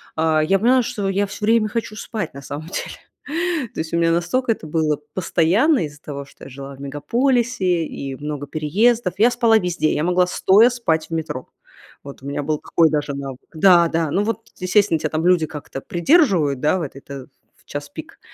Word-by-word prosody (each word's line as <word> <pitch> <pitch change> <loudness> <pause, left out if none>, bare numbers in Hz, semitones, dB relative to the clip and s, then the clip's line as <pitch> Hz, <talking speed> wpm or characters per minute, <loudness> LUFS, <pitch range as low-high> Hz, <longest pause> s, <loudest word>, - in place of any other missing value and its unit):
А, 160 -1 +2
я 195 +5 +2
поняла, 250 +4 +4
что 200 -3 -3
я 200 +1 0
всё 195 - -9
время 225 -1 +3
хочу 220 -1 -4
спать, 215 -5 -5
на 140 - -9
самом 145 +3 -7
деле. - - -5 0.8
То - - -7
есть 160 +1 -7
у - - +2
меня 165 0 +3
настолько 225 +9 +1
это 190 - -12
было 155 -1 0 0.2
постоянно, 185 - +2
из-за 150 0 -11
того 140 -1 -6
что 140 - -15
я - - -10
жила 135 +1 -9
в 135 - -18
мегаполисе, 190 - 0
и 135 -2 -6
много 145 0 -5
переездов. 185 +7 +1
Я 230 +3 +6
спала 225 -2 +4
везде, 175 -4 0
я 150 - -1
могла 180 0 +3
стоя 205 +6 +5
спать 165 -11 -1
в - - -7
метро. 160 -5 -4 0.5
Вот 140 -1 -11
у - - -7
меня 140 +1 -3
был 150 0 -1
какой 165 -1 +2
даже 145 -1 -1
навык. 135 -2 -6
Да-да, 165 -2 +4
ну 200 - +1
вот, 225 -1 -4
естественно, 185 -1 +2
тебя 155 - -2
там 155 +2 -2
люди 180 -3 +4
как-то 145 -3 -8
придерживают, 175 - +2
да, 150 +5 +2
вот 150 -6 -5
это 135 -1 -9 0.3
в - - -29
час - - -5
пик. - - -10
165 Hz, 200 wpm, -21 LUFS, 150-210 Hz, 0.8 s, Я